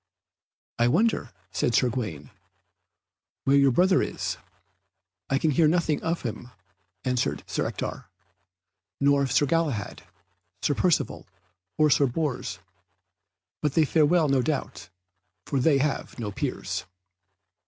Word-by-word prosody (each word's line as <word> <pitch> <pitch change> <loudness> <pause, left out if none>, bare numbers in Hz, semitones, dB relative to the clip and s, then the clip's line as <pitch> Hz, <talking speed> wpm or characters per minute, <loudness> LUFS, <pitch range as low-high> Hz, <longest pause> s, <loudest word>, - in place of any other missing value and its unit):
"I 120 - +4
wonder," 180 - +2 0.2
said 120 +4 0
Sir 125 - +3
Gawaine, 105 - -5 1.1
"where 135 - +3
your 140 -1 +5
brother 185 +8 +4
is." - - -3 0.9
"I 135 - +2
can 155 +2 +1
hear 155 +3 +4
nothing 160 -2 +1
of 165 +1 -2
him," 120 +1 -5 0.6
answered 120 - 0
Sir - - -2
Ector, - - -5 0.9
"nor 140 0 +3
of 135 -3 -1
Sir 145 - +3
Galahad, 145 -8 -1 0.6
Sir 145 - +2
Percivale, 170 +3 0 0.5
or 155 -1 +4
Sir 140 0 +4
Bors, 135 0 -2 1.0
but 150 -2 -1
they 160 - +5
fare 150 +1 +3
well, 170 -1 +3
no 135 -2 +3
doubt, 140 - -3 0.6
for 140 - -1
they 140 +2 +4
have 140 +1 -2
no 110 -4 -4
peers." - - -3
140 Hz, 130 wpm, -26 LUFS, 125-155 Hz, 1.1 s, your